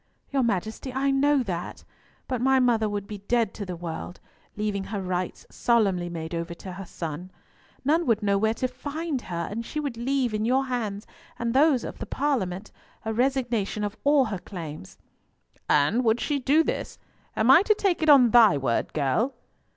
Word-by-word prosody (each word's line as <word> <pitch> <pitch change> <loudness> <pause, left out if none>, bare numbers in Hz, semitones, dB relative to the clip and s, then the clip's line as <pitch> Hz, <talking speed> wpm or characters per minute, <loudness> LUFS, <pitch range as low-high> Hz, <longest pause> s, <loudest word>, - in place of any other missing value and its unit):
"Your 275 -1 +2
Majesty, 220 +3 -2
I 270 +2 +1
know 280 0 +3
that. 180 -5 -5 0.4
But 255 -3 -2
my 265 +1 +4
mother 230 -4 +2
would 205 -1 -3
be 205 0 -7
dead 230 +1 0
to 200 - -6
the 180 - -4
world, 170 +1 -6 0.4
leaving 205 -2 -2
her 205 0 -4
rights 185 -1 -3
solemnly 195 -7 +1
made 165 -1 -6
over 170 0 -4
to 185 - -9
her 190 +2 -7
son. 165 +2 -6 0.6
None 320 +4 +2
would 220 -3 +2
know 200 -1 +2
where 220 +2 +1
to 255 - -1
find 290 +2 -4
her, 170 -4 -4
and 230 +3 -3
she 300 - -5
would 280 -6 -4
leave 255 -1 0
in 215 0 -1
your 260 +4 +2
hands, 220 -5 -3 0.3
and 235 0 -2
those 275 -1 +4
of - - -7
the - - -6
Parliament, 215 -9 -2 0.3
a 220 - -1
resignation 240 -4 0
of 205 +1 -3
all 285 -2 +4
her 205 -5 -4
claims." 160 - -8 0.7
"And 150 - +3
would 225 0 +2
she 290 +2 -1
do 285 +5 +3
this? - - -4 0.4
Am 225 +4 +5
I 300 - +8
to 430 +1 +3
take 390 -5 0
it 315 - +2
on 255 -5 +7
thy 225 -11 +7
word, 130 -4 -1
girl?" 160 - 0
225 Hz, 190 wpm, -26 LUFS, 190-265 Hz, 0.7 s, I